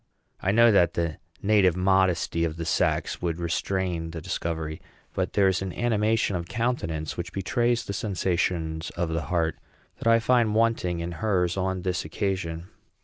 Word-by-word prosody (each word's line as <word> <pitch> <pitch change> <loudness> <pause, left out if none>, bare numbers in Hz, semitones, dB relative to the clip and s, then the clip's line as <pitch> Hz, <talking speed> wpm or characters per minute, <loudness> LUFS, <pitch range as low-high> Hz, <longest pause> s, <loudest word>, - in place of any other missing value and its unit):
I 95 - +1
know 115 +2 +6
that 85 -4 +4
the 85 -3 -1 0.2
native 100 -4 +4
modesty 90 -3 +2
of 80 -1 -2
the 85 - -4
sex 80 - 0
would 85 -2 -1
restrain 85 -1 -1
the 80 0 -6
discovery; 80 0 -4 0.3
but - - -2
there 100 -2 +4
is 95 -1 +1
an 95 -1 -3
animation 110 -3 +1
of 85 -1 -3
countenance, 85 -11 -2
which 85 0 -4
betrays 120 +5 0
the 100 - -4
sensations 85 -5 -1
of 85 -1 0
the 80 0 -1
heart, 80 0 0 0.4
that - - -3
I 115 0 +6
find 115 -2 +2
wanting 110 -7 +1
in 85 +1 -4
hers 90 -5 +1
on 95 -1 -1
this 90 -2 -1
occasion. 90 -3 -3
90 Hz, 165 wpm, -26 LUFS, 85-105 Hz, 0.4 s, know